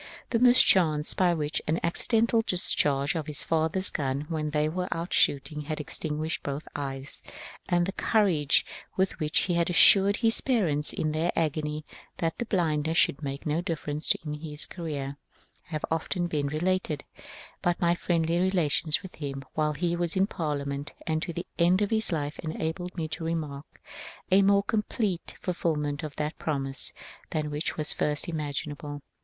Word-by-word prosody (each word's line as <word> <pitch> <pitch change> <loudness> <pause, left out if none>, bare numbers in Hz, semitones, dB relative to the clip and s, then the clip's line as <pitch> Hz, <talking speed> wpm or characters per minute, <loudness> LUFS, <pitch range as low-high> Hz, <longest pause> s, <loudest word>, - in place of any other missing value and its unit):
The 230 - +2
mischance 185 -11 +5
by 180 -2 +2
which 150 -1 -1
the 160 +2 0
accidental 225 +6 +2
discharge 145 -8 +2
of 160 -3 -3
his 150 -1 +1
father's 165 +4 +2
g^n, 140 +1 -2
when 155 -2 -1
they 150 0 +1
were 180 +3 -2
out 165 +2 -3
shooting, 150 +2 +2
had 155 +1 -4
extinguished 155 +1 -2
both 140 +2 -5
eyes, 135 -1 -5 0.5
and 175 0 +3
the 195 - -2
cour 210 +2 +2
age 150 -5 +3 0.3
with 190 -1 0
which 155 -1 +2
he 180 - 0
had 170 0 +1
assured 195 +3 +6
his 225 -1 +2
parents 170 - +2
in 155 - -1
their 160 +3 0
agony 155 -1 -1 0.3
that 165 -1 -1
the 240 - -1
blindness 160 -5 0
should 140 - +3
make 140 -1 -5
no 155 +2 0
difference 155 -3 -1
in 150 - -3
his 150 0 +1
career, 145 -5 -5 0.5
have 155 -2 -4
often 175 +2 -1
been 150 -4 -1
related; 160 0 -1 0.6
but 175 -1 0
my 170 -1 +3
friendly 170 -1 0
relations 175 -4 +3
with 190 - -9
him 135 -2 -5
while 150 -1 0
he 170 +3 -1
was 175 -1 -2
in 190 +1 +4
Parliament 145 -6 -3
and 160 -2 0
to 170 - -3
the 170 +2 -5
end 175 +2 +4
of 205 - -2
his 220 -2 +3
life 150 -2 -3
enabled 165 +3 -4
me 160 -2 -2
to 155 +1 -5
remark 155 -3 -4 0.5
a 190 +2 +6
more 200 0 +4
complete 210 -3 -2
fulfilment 150 -5 -1
of 155 -2 -6
that 150 +1 -3
promise 135 -3 0 0.4
than 150 -1 -2
was 150 +2 -1
at 155 - -2
first 150 +3 0
imaginable. 145 -2 -4
160 Hz, 170 wpm, -27 LUFS, 150-175 Hz, 0.6 s, assured